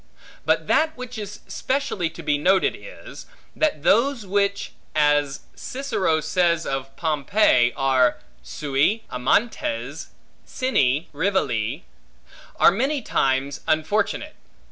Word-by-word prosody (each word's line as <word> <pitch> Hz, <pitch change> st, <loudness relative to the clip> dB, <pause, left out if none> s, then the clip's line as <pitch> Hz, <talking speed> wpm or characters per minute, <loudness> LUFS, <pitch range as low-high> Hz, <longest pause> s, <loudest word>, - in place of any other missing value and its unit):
But -, -, +2 dB
that 315 Hz, -1 st, +2 dB
which 250 Hz, -2 st, -7 dB
is 205 Hz, 0 st, -7 dB
specially 260 Hz, -11 st, -2 dB
to 170 Hz, -, -11 dB
be 150 Hz, -1 st, +1 dB
noted 190 Hz, +5 st, +3 dB
is, -, -, -12 dB, 0.3 s
that 300 Hz, -, 0 dB
those 235 Hz, -, +2 dB
which 200 Hz, +1 st, 0 dB, 0.2 s
(as 145 Hz, -2 st, +2 dB
Cicero 220 Hz, -, -1 dB
says 170 Hz, -2 st, +1 dB
of 135 Hz, 0 st, -4 dB
Pompey) 150 Hz, -, +2 dB
are 130 Hz, -2 st, +3 dB, 0.2 s
sui 150 Hz, +10 st, 0 dB
amantes, 130 Hz, -, -1 dB, 0.4 s
sine 150 Hz, -, 0 dB
rivali, 140 Hz, -, -1 dB, 0.8 s
are -, -, +7 dB
many 265 Hz, +7 st, -1 dB
times 135 Hz, -5 st, 0 dB
unfortunate. 160 Hz, +7 st, 0 dB
170 Hz, 105 wpm, -23 LUFS, 140-215 Hz, 0.8 s, are